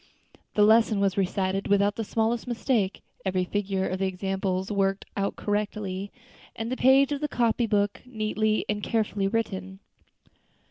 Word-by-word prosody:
The 210 - +5
lesson 220 0 +5
was 195 -1 +2
recited 195 0 0
without 200 0 +3
the 225 - -2
smallest 225 +3 -1
mistake, 230 -4 0 0.2
every 185 -1 0
figure 195 -1 -1
of 185 - -3
the 195 - +1
examples 190 0 -2
worked 195 -1 0
out 200 0 -1
correctly, 205 -2 -3 0.4
and 225 +2 -4
the - - 0
page 265 +2 +5
of 285 0 -2
the 300 - 0
copy 235 -3 +1
book 205 -1 0
neatly 215 -2 -1
and 210 0 -1
carefully 210 -3 0
written. 195 -3 -2
205 Hz, 150 wpm, -26 LUFS, 195-225 Hz, 0.4 s, The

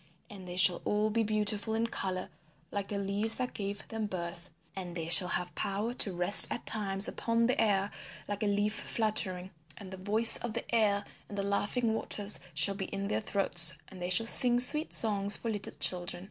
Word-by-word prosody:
And 190 -3 -12
they 175 - -8
shall 180 -1 +2
all 210 +1 -1
be 230 +2 0
beautiful 215 0 -1
in 225 +1 -1
colour 185 -5 -5 0.4
like 200 -1 -5
the 205 - -5
leaves 200 +3 -1
that 250 -1 -4
gave 200 -1 -7
them 220 -1 -4
birth; 170 -2 -7 0.3
and 180 -3 -8
they 165 -1 -5
shall 180 +1 +8
have 180 0 -3
power 205 +4 -3
to 215 -5 +3
rest 180 +3 +5
at - - -6
times 195 -2 +2
upon 230 0 -1
the 250 -1 0
air 200 -2 0 0.4
like 205 -1 -5
a 210 - -1
leaf 205 +1 -1
fluttering; 190 -5 -1 0.3
and 190 -2 -11
the 190 - -8
voice 215 +4 +3
of 240 -2 -7
the 235 - -5
air 205 -3 +1 0.3
and 205 - -8
the 200 - -2
laughing 210 +4 -2
waters 210 -2 0 0.2
shall 200 - +4
be 195 -1 -6
in 195 +1 -6
their 110 - -2
throats 175 - +3
and 185 -2 -13
they 180 - -4
shall 185 +5 +1
sing 245 +1 +2
sweet 300 +6 +6
songs 205 -2 +1
for 230 - -5
little 205 -2 -5
children. 175 -1 -1
200 Hz, 200 wpm, -29 LUFS, 190-220 Hz, 0.4 s, shall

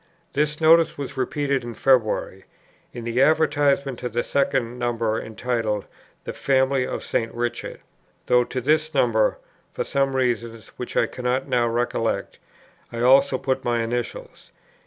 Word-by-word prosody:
This 150 +1 0
notice 165 +1 +5
was 140 -1 -6
repeated 140 +1 -1
in 120 -1 -7
February, 110 -7 +1 0.5
in 120 - -8
the 120 +2 0
advertisement 145 -3 +2
to 125 - -4
the 120 +1 -1
second 125 -3 0
number 115 -2 -1
entitled 110 -2 -2 0.4
"The - - -5
Family 130 -1 +1
of - - -4
St. 115 0 -1
Richard," 120 0 -4 0.4
though 125 0 +4
to 130 - -4
this 155 +3 +1
number, 115 -5 +2 0.3
for - - -3
some 135 -1 0
reason 120 -3 -1 0.2
which 125 - -6
I - - +4
cannot 125 +1 -2
now 120 -1 +2
recollect, 115 -1 -2 0.5
I 115 - -5
also 135 +2 +5
put 130 0 -2
my 120 -1 0
initials. 120 +1 -5
125 Hz, 145 wpm, -23 LUFS, 120-140 Hz, 0.5 s, notice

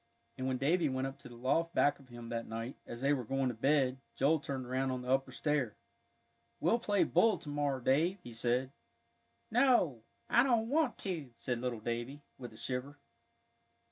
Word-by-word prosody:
And 130 - -3
when 130 -1 0
Davie 155 +4 +2
went 130 0 -1
up 135 +1 -6
to 140 - -11
the 120 - -11
loft 145 +8 0
back 145 - +3
of 135 - -17
him 120 -1 -9
that 115 -1 -3
night, 115 +3 -5
as 120 - -7
they 140 +2 +3
were 130 -3 -1
going 135 +2 0
to - - -2
bed, 135 +2 +2 0.2
Joel 155 +4 +3
turned 135 -3 -4
around 130 +2 -1
on 130 -1 -3
the 125 - -6
upper 135 0 +2
stair. 140 -5 -1 0.8
"We'll 175 +10 +3
play 205 -4 +2
bull 225 -2 +4
to 150 - -9
morrow, 145 -2 0
Dave," 155 +10 +2
he 120 - -9
said. 125 +3 0 0.8
"No, 230 - +4 0.3
I 240 - +5
don't 235 -3 +2
want 305 -2 +2
to," 165 -9 -3
said 120 0 -3
little 125 -3 -2
Davie, 120 +5 -4 0.2
with 120 -2 -7
a 110 - -14
shiver. 130 +4 -4
135 Hz, 195 wpm, -33 LUFS, 125-155 Hz, 0.8 s, I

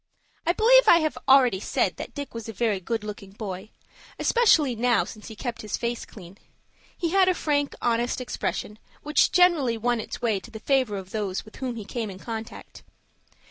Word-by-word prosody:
I 345 - +4
believe - - +5
I 340 - +8
have 310 -1 -1
already 255 -7 +5
said - - -1
that - - -8
Dick 285 -2 -6
was 230 -1 -7
a - - -6
very 215 -2 0
good 225 +4 -3
looking 205 -2 -8
boy, 200 -1 -6 0.5
especially 320 - +3
now 240 0 +2
since 215 -1 -10
he 220 - -9
kept 240 +1 -5
his 215 - -3
face 235 0 -3
clean. 190 -1 -13 0.6
He 335 -3 -1
had 380 0 +4
a 365 - +2
frank, 290 -3 0
honest 240 +1 0
expression, 215 -3 -4 0.2
which 300 +1 +3
generally 330 -10 +4
won 240 +1 0
its - - -6
way 220 -4 0
to 215 - -13
the 220 -2 -9
favor 255 -4 +1
of 190 0 -8
those 200 -4 -3
with 215 - -14
whom 255 -2 -4
he 220 -3 -7
came 225 0 -4
in 190 - -8
contact. 225 +2 -8
235 Hz, 195 wpm, -25 LUFS, 210-280 Hz, 0.6 s, I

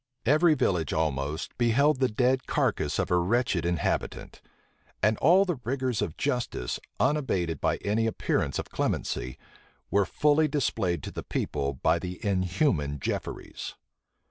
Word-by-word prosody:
Every 155 +5 +5
village 90 - 0
almost 75 -1 -2
beheld 130 +5 +3
the 130 - +3
dead 130 +4 +1
carcass 115 - 0
of - - -1
a 90 - +4
wretched 95 -2 +1
inhabitant. 85 -3 -2 0.6
And 110 +1 +4
all 180 +7 +5
the 175 -8 -2
rigors 130 -1 -1
of 80 - -3
justice, 125 - -2 0.2
unabated 95 - 0
by - - +2
any 110 +3 +1
appearance 110 - -1
of - - -5
clemency, 65 +2 -2 0.5
were 100 0 +3
fully 150 +1 +3
displayed 105 - -1
to - - -5
the - - -5
people 70 -1 -2
by - - +2
the 90 0 -6
inhuman 90 - +1
Jefferies. - - -5
105 Hz, 140 wpm, -28 LUFS, 85-135 Hz, 0.6 s, Every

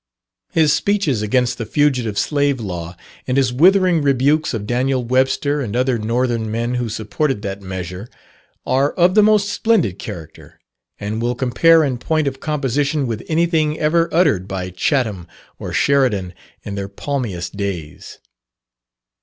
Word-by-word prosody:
His 155 -2 +3
speeches 180 - 0
against 125 +4 0
the 115 - -3
Fugitive 125 -7 +1
Slave 145 +4 +1
Law, 90 -5 -6 0.3
and 130 +1 0
his 130 -3 +2
withering 180 +3 +4
rebukes 140 +2 +2
of 110 -4 -4
Daniel 125 +3 0
Webster 135 +3 +1
and 115 -4 -4
other 125 -1 +1
northern 115 0 -1
men 115 +2 -2
who 120 -2 -2
supported 110 +3 -2
that 100 -1 -5
measure, 95 +2 -6 0.6
are 135 +3 +1
of 180 +1 +3
the 215 - +6
most 210 -1 +3
splendid 205 - +1
character, 80 -3 -10 0.4
and 105 +2 -3
will 120 +1 -1
compare 160 +6 +4
in 130 -4 -1
point 155 +2 0
of 135 -1 -3
composition 145 0 -1
with 115 -3 -3
anything 160 -2 +1
ever 165 +2 +2
uttered 150 - +2
by 95 -1 -4
Chatham 105 - -1 0.3
or - - -6
Sheridan 120 -10 +1 0.3
in 100 - -6
their 100 -1 -4
palmiest 100 -7 -4
days. 95 -7 -6
125 Hz, 145 wpm, -19 LUFS, 105-150 Hz, 0.6 s, the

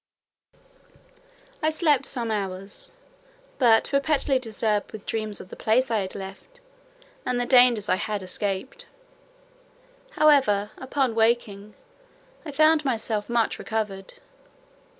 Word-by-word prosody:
I 310 - +2
slept 300 -4 +2
some 235 -4 -3
hours, 195 - -4 0.7
but 230 -4 +4
perpetually 280 -1 +1
disturbed 220 -3 -2
with 215 -2 -10
dreams 215 -2 -2
of 185 - -11
the - - -9
place 240 +4 +1
I 225 - +2
had 190 -1 -5
left, 195 - -10 0.6
and 250 -1 -1
the 245 - 0
dangers 245 -5 +5
I 185 - +2
had 205 0 -3
escaped. 205 - -4 1.3
However, 260 -9 +4
upon 260 -2 -1
waking, 220 -3 0 0.7
I 300 - -7
found 310 +1 +4
myself 225 -5 -2
much 235 -1 0
recovered. 205 -3 -4
225 Hz, 115 wpm, -25 LUFS, 205-270 Hz, 1.3 s, dangers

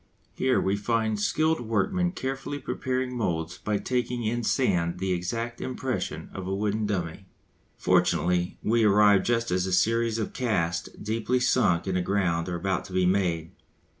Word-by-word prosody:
Here 130 -1 +2
we 95 +1 +1
find 110 0 0
skilled 155 +10 +1
workmen 175 - 0
carefully 135 -1 -4
preparing 130 -2 -2
moulds 85 -7 -2
by 105 -1 -1
taking 125 +1 -2
in 120 +2 -1
sand 90 -9 +1
the 95 +1 -2
exact 115 +7 -3
impression 130 0 -3
of 95 -1 -6
a 95 - -1
wooden 105 +1 -1
dummy. 95 -2 -3 0.5
Fortunately 90 0 +2
we 115 +1 +3
arrive 105 -1 +5
just 115 0 0
as 90 +1 +1
a - - -2
series 115 +4 +2
of 110 - -3
casts 100 -10 -1
deeply 115 +4 -1
sunk 120 -9 +2
in 95 - -1
the 90 - +1
ground 90 -2 0
are 90 - -2
about 95 +1 -1
to 95 - -10
be 95 0 +2
made. 90 -4 +1
105 Hz, 165 wpm, -27 LUFS, 90-120 Hz, 0.5 s, arrive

